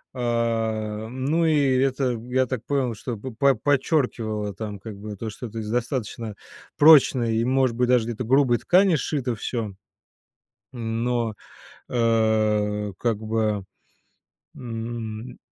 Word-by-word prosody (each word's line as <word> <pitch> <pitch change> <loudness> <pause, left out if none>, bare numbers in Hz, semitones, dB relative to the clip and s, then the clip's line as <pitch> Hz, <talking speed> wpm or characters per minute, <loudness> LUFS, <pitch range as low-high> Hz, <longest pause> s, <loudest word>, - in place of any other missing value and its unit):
Э, 115 -3 -1
ну 135 +7 0
и 145 -4 +3
это, 130 -1 +1 0.2
я 130 +1 +2
так 125 -2 -4
понял, 130 -5 0
что 115 +1 -5
по 130 +4 +1
подчеркивало 120 - 0
там 105 -1 -6
как 105 0 -9
бы 105 +1 -7
то, 110 +3 -5
что 110 +4 -8
это 115 0 -6
из 105 -1 -5
достаточно 115 -2 -3 0.4
прочной 135 -6 +6
и, 115 - +1
может 130 -2 +2
быть, 125 +1 +1
даже 125 -3 +4
где-то 120 +1 -3
грубой 130 0 +3
ткани 185 +3 +4
сшито 135 -4 -1
всё. 110 -1 -4 1.0
Но, 115 -1 -1 0.6
э, 110 -3 +1
как 115 -3 0
бы, 110 -2 -1 0.9
м, 115 0 -6
115 Hz, 130 wpm, -24 LUFS, 110-130 Hz, 1.0 s, прочной